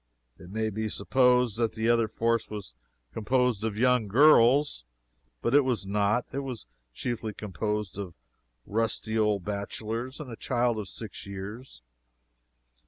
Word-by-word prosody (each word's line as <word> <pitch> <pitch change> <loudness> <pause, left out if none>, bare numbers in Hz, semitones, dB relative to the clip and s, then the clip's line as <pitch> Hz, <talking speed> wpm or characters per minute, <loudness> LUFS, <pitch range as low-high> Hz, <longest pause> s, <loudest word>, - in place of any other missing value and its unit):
It 85 - -12
may 110 +2 -1
be 110 +1 -2
supposed 125 +1 +2
that 115 -2 +1
the 110 0 -1
other 115 -1 +3
fourth 115 +1 0
was 105 -4 -7 0.4
composed 125 -1 +1
of 110 -2 -2
young 125 -2 +3
girls. 135 - +5 0.6
But 120 - +1
it 145 - +7
was 125 -6 -1
not. 105 +4 +1
It 135 - -3
was 130 -6 -6 0.3
chiefly 110 - -4
composed 105 -1 -3
of 95 -4 -6 0.5
rusty 110 0 -1
old 105 -4 +1
bachelors 110 +6 -4
and 140 -5 -7
a - - -6
child 120 0 0
of 105 - -5
six 110 -1 -8
years. 100 - -8
110 Hz, 145 wpm, -28 LUFS, 105-125 Hz, 0.6 s, it